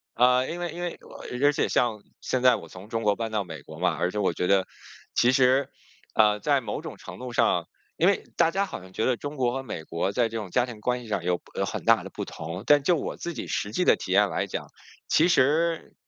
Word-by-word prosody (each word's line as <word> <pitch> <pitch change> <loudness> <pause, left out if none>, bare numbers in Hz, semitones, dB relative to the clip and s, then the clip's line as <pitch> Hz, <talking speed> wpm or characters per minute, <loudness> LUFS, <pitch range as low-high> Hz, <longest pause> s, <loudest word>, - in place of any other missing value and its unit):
呃， 125 +2 +4
因 170 - -4
为 175 -2 -3
因 170 +2 -7
为， 175 -1 -3 0.4
而 140 +3 +4
而 145 - +4
且 - - 0
像 115 -4 +1 0.2
现 130 - -1
在 125 -1 +6
我 85 - -8
从 95 +5 -12
中 115 0 -2
国 105 -1 +3
搬 115 0 -4
到 105 -2 0
美 80 -5 -9
国 - - -11
嘛， - - +1
而 90 - 0
且 105 - -6
我 95 -4 +1
觉 90 - -1
得， 95 -1 +3 0.5
其 120 - +4
实， 130 +1 +3 0.5
呃， 105 -1 +4
在 140 +4 +2
某 105 -3 -4
种 - - -8
程 - - -10
度 125 0 -6
上 - - +2 0.3
因 170 - +3
为 200 - +2
大 165 -1 +3
家 195 +3 +1
好 195 - -7
像 95 0 -14
觉 110 - -1
得 130 - +2
中 145 +4 -6
国 125 -2 +1
和 135 0 -3
美 95 -10 -6
国 85 +4 -2
在 120 +2 +2
这 115 - -4
种 105 -4 -5
家 125 +4 +2
庭 115 -4 -9
关 125 +2 0
系 - - -11
上 100 -5 -1
有 90 0 0 0.2
有 - - 0
很 - - -5
大 - - +5
的 - - -8
不 - - -5
同。 85 +5 -7
但 145 0 +6
就 175 +5 +3
我 155 - -3
自 170 - -5
己 - - -5
实 105 - -2
际 180 - 0
的 - - +6
体 - - -6
验 - - +4
来 - - -1
讲， - - -5 0.4
其 160 - +4
实， 165 +2 +2
125 Hz, 285 characters per minute, -26 LUFS, 105-145 Hz, 0.5 s, 在